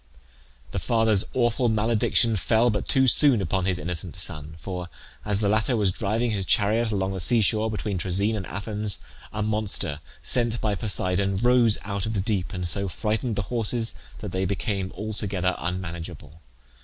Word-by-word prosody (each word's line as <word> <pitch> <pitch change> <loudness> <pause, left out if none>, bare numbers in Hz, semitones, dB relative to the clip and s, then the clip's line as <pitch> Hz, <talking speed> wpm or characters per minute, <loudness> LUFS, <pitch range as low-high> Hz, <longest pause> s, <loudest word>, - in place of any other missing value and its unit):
The - - -2
father's 110 -4 +3
awful 120 0 +2
malediction 110 +1 +2
fell 115 +4 +2
but 105 - -3
too 130 -1 +3
soon 135 -1 +6
upon 95 0 -1
his 95 -2 0
innocent 90 -1 -4
son; 75 -4 -2
for, 90 0 -6 0.3
as 105 0 0
the 105 - +2
latter 110 +4 +2
was 100 -3 +2
driving 110 +5 -1
his 100 -2 -1
chariot 110 +4 +2
along 95 -2 -1
the 95 - -4
sea 115 +5 +2
shore, 110 +2 +2
between 105 -3 -3
Troezen 100 +5 0
and 95 -3 -4
Athens, 105 +1 -3 0.3
a 105 0 -2
monster, 105 -7 -1 0.2
sent 120 -2 +2
by 105 -2 0
Poseidon, 100 -2 0
rose 120 0 +4
out 100 0 -3
of 110 - -2
the 100 - -1
deep, 95 -2 -1
and 90 -3 -2
so 100 +3 +2
frightened 110 +4 -2
the 105 - -1
horses 115 0 0 0.3
that - - -5
they 95 0 -1
became 95 0 -2
altogether 100 -4 -1
unmanageable. 85 -2 -6
105 Hz, 170 wpm, -25 LUFS, 95-110 Hz, 0.3 s, soon